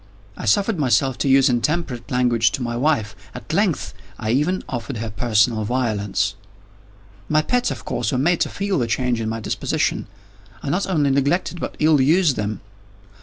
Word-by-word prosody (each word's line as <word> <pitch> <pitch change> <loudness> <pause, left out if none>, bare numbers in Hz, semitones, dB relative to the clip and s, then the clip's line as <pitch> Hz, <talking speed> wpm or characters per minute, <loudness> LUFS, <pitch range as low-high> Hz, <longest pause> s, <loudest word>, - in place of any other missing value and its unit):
I - - -7
suffered 195 - +2
myself 135 -1 +2
to 140 - +1
use 135 0 +5
intemperate 125 0 -1
language 120 -3 +2
to 130 - -2
my 120 -1 -3
wife. 120 -6 0 0.2
At 155 - -7
length, 195 -3 0 0.2
I 110 - -2
even 150 +9 +1
offered 120 0 -4
her 110 0 -4
personal 110 0 +2
violence. 105 -4 -1 1.0
My 155 0 +3
pets, 245 +6 +1
of 120 -8 -6
course, 120 -2 -2
were 130 - 0
made 165 +6 +2
to - - +1
feel 200 -4 -1
the 120 - 0
change 120 0 0
in 110 - -2
my 115 0 -3
disposition. - - -1 0.6
I 140 - -2
not 185 +5 0
only 150 -7 +2
neglected, 145 +6 0
but - - -5
ill 155 -2 +4
used 155 +1 +3
them. 105 -1 -3
130 Hz, 175 wpm, -21 LUFS, 115-155 Hz, 1.0 s, use